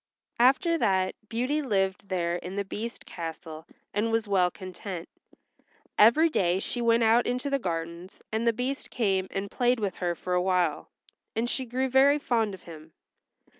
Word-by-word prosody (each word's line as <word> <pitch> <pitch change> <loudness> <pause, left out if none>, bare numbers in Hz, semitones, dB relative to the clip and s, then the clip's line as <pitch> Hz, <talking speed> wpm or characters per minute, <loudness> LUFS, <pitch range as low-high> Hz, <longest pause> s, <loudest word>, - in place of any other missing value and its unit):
After 325 +7 +4
that 190 -5 +2 0.2
Beauty 255 +6 0
lived 195 -6 -1
there 175 -2 0
in 180 +2 -7
the 200 0 -2
Beast's 225 +4 -6
castle 160 -1 -7 0.3
and 215 +3 0
was 225 -1 0
well 185 -3 +3
content. 185 -1 -7 0.9
Every 235 +10 +6
day 185 - +1
she 240 +4 -3
went 230 0 +3
out 225 +2 +4
into 250 +3 -2
the 275 - +2
gardens, 170 -2 -5
and 220 +2 -1
the - - +6
Beast 250 +4 -4
came 195 -5 0
and 195 +1 -4
played 245 0 +2
with 200 -4 -2
her 175 -1 -1
for 180 +2 -4
awhile, 180 0 +1 0.5
and 225 +2 0
she 260 +2 -2
grew 255 +3 0
very 270 +3 +5
fond 225 -8 0
of 185 - -18
him. 160 -1 -12
205 Hz, 170 wpm, -27 LUFS, 180-245 Hz, 0.9 s, Every